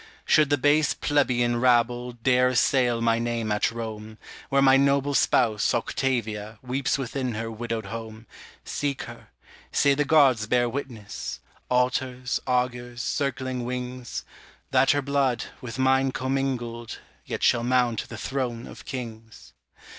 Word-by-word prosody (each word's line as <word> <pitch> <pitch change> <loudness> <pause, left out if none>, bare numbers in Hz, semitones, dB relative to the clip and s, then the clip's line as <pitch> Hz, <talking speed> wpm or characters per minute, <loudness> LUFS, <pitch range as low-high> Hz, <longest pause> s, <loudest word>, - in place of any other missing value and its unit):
Should 155 -2 +4
the 145 - +3
base 145 +2 +3
plebeian 120 -5 +1
rabble 120 0 +2
Dare 125 +2 +3
assail 125 -2 +2
my 115 0 +2
name 115 -2 -2
at 105 - +2
Rome, 110 -1 -7 0.3
Where 140 - +3
my 135 -1 +6
noble 140 +1 +2
spouse, 110 -5 +2
Octavia, 110 -5 -2
Weeps 130 +2 0
within 130 -2 -3
her 115 +1 -4
widowed 115 -1 -4
home, 110 +1 -7 0.4
Seek 140 -2 -2
her; - - -11 0.4
say 140 - +4
the 145 +2 +1
gods 135 -8 +4
bear 120 +1 +2
witness 120 -5 -6 0.3
Altars, 125 0 0
augurs, 120 -1 -1
circling 130 -3 -2
wings 125 0 -5 0.5
That 135 0 +4
her 145 -1 +3
blood, 135 -4 0 0.2
with 120 -2 -7
mine 130 0 +2
commingled, 125 -3 -2 0.3
Yet - - -5
shall 120 - +3
mount 120 -2 +1
the - - -7
throne 125 -3 -3
of - - -12
kings. 115 -4 -8
125 Hz, 135 wpm, -25 LUFS, 115-135 Hz, 0.5 s, my